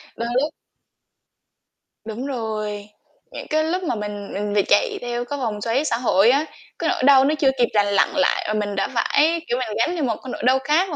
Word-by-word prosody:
Đôi 235 - -3
lúc 300 - -2 1.5
Đúng 225 +4 -6
rồi. 215 -5 -4 0.4
Những - - -8
cái 310 0 +2
lúc 360 +4 -1
mà 280 - -1
mình 205 -1 -6
mình 205 +1 -3
bị 205 - +4
chạy 450 -5 +2
theo 240 0 -3
cái 285 +3 -5
vòng 215 -5 -3
xoáy 240 +7 0
xã 230 - 0
hội 225 -3 +3
á, 280 +4 +3 0.3
cái - - 0
nỗi - - -1
đau 270 -1 +6
nó 300 +2 +2
chưa 275 - +4
kịp 240 -1 +3
lành 205 -1 +3
lặn 200 -1 +3
lại 280 - +1
mà 215 - -1
mình 205 -1 -2
đã 195 - 0
phải, 310 +8 +2
kiểu, 240 - 0
mình 220 -4 -3
gánh 335 +9 +1
theo 325 - -2
một 230 -5 0
cái 260 - -7
nỗi - - -6
đau 260 +1 +4
khác 310 +7 +2
và - - -3
245 Hz, 230 wpm, -22 LUFS, 210-285 Hz, 1.5 s, đau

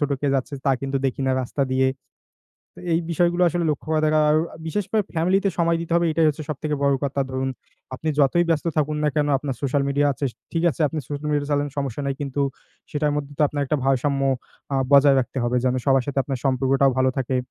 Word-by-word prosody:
ছোটকে 145 -1 -1
যাচ্ছে 135 +2 -2
তা 135 - +3
কিন্তু 135 0 -2
দেখি 135 - -3
না 130 - +2
রাস্তা 140 +3 -2
দিয়ে। 130 0 +3 0.9
তো - - -11
এই 165 - +3
বিষয়গুলো 175 +2 +2
আসলে 170 +1 -1
লক্ষ্য 145 - -4
করা 155 -1 +2
দরকার। 155 0 +3
আর 150 - +4 0.3
বিশেষ 205 +5 -1
করে 215 -2 +2
ফ্যামিলিতে 185 +5 +2
সময় 170 0 +2
দিতে 165 0 -5
হবে 170 0 +3
এইটাই 160 0 +3
হচ্ছে 155 +1 -2
সব 155 - -2
থেকে 150 -1 -1
বড় 140 -1 +3
কথা। 140 0 -1
ধরুন, 130 0 -2 0.5
আপনি 160 +4 -4
যতই 150 +5 +4
ব্যস্ত 165 +1 0
থাকুন 150 0 +1
না 150 - +4
কেন, 150 - +2
আপনার 135 -1 -4
সোশাল 140 0 +1
মিডিয়া 145 +1 +2
আছে, 135 -1 -2 0.2
ঠিক 165 - 0
আছে। 145 - -10
আপনি 160 - -4
সোশাল 145 +1 -4
মিডিয়া 145 -1 0
চালান 145 0 +1
সমস্যা 140 -2 -3
নাই। 140 - -1
কিন্তু 140 0 -2 0.5
সেটার 150 0 0
মধ্যে 145 -1 -4
তো - - +3
আপনার 145 0 -2
একটা 150 - +1
ভারসাম্য 135 +1 +1 0.5
আ - - +2 0.2
বজায় 140 -1 +7
রাখতে 130 +1 -4
হবে 120 +1 0
যেন 130 0 +2
সবার 135 -1 +4
সাথে 140 -1 -2
আপনার 135 -1 -3
সম্পর্কটাও 135 +1 +3
ভালো 130 0 +3
থাকে। 130 0 -1
145 Hz, 225 wpm, -23 LUFS, 135-155 Hz, 0.9 s, বজায়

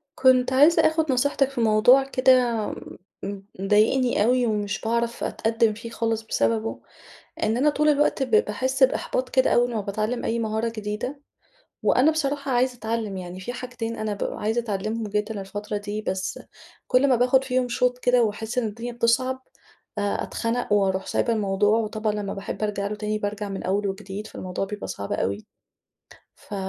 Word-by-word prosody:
كنت 260 -1 +4
عايزة 295 +6 +6
آخُد 315 -2 0
نصيحتِك 275 +1 +2
في 270 -3 -3
موضوع 225 +5 +5
كده 255 -4 +3 0.6
م 200 0 -5 0.2
مضايقني 215 +4 +3
أوي 250 +2 +3
ومش 210 -2 -1
باعرف 235 +1 -1
أتقدّم 225 0 +1
فيه 230 +2 -8
خالص 225 -1 -1
بسببه، 225 0 -1 0.6
إن 220 +1 +1
أنا 290 +4 +3
طول 300 +1 +1
الوقت 295 -1 +2
ب 260 - -2
باحس 255 +5 +1
بإحباط 260 0 +2
كده 260 0 +2
أول 245 0 +2
ما 220 - 0
باتعلم 215 +4 -2
أي 230 - 0
مهارة 220 0 -1
جديدة، 220 +5 -5 0.6
وأنا 270 +5 +4
بصراحة 285 -3 -2
عايزة 250 +1 +2
أتعلّم 220 -3 -3
يعني، 180 0 -7
في 215 +6 -5
حاجتين 245 -2 -5
أنا 215 -2 -2
بابقى 200 - -4
عايزة 220 +3 0
أتعلّمهم 215 0 -3
جدًا 210 0 -2
الفترة 205 +2 -5
دي، 205 +1 -4
بس 190 -2 -3 0.5
كل 255 +2 +3
ما 255 - +4
باخُد 250 +2 +3
فيهم 255 -1 0
شُوط 250 +1 +1
كده 245 -1 +3
واحس 220 +2 -2
إن 240 - +1
الدنيا 230 +3 -5
بتصعب، 240 +3 +1 0.6
آآ، 205 0 0
أتخنق 230 -1 -2
وأُروح 190 -2 +2
سايبة 235 - 0
الموضوع. 205 0 +2
وطبعًا 215 -1 -1
لما 205 -1 -3
باحب 200 +2 -6
ارجع 205 -1 -1
له 205 - -3
تاني 210 0 -2
بارجع 205 0 -3
من 195 -1 -5
أول 200 +2 0
وجديد، 195 +1 -6
فالموضوع 185 -1 -4
بيبقى 205 +1 -6
صعب 100 0 -5
أوي. 100 +2 -2 0.9
ف 205 - -10
225 Hz, 170 wpm, -24 LUFS, 210-250 Hz, 0.9 s, عايزة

